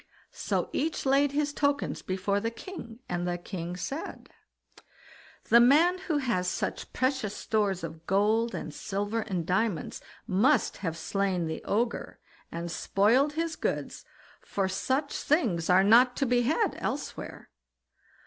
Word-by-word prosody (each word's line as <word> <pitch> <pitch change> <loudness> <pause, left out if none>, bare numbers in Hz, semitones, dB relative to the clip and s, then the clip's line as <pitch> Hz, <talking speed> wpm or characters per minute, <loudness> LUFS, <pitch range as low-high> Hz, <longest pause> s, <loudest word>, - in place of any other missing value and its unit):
So - - -2
each 315 +1 -1
laid 275 +1 +3
his 290 0 0
tokens 285 -1 0
before 195 +2 -1
the 225 +2 -1
king, 235 -3 -9
and 175 0 -2
the 175 0 -1
king 175 -1 -6
said: 275 - -6 1.2
"The 235 - +8
man 315 +9 +5
who 340 -5 -1
has 235 -10 0
such - - -3
precious 255 -6 -1
stores 200 -5 0
of 160 0 -8
gold, 215 +3 +2
and 160 -3 -5
silver, 205 +5 -2
and 185 -6 -3
diamonds, 185 -2 -1 0.2
must 235 +8 +2
have 165 -4 -3
slain 190 -1 -1
the 160 0 -4
Ogre, 230 +3 -1 0.3
and 170 0 -4
spoiled 235 - +2
his 330 +1 -2
goods, - - -3 0.4
for 195 -1 -1
such 265 +9 -1
things 220 - +1
are 185 +1 +6
not 245 +5 +6
to 275 - 0
be 245 -1 +3
had 315 - +1
elsewhere." 285 - -5
220 Hz, 140 wpm, -28 LUFS, 185-275 Hz, 1.2 s, The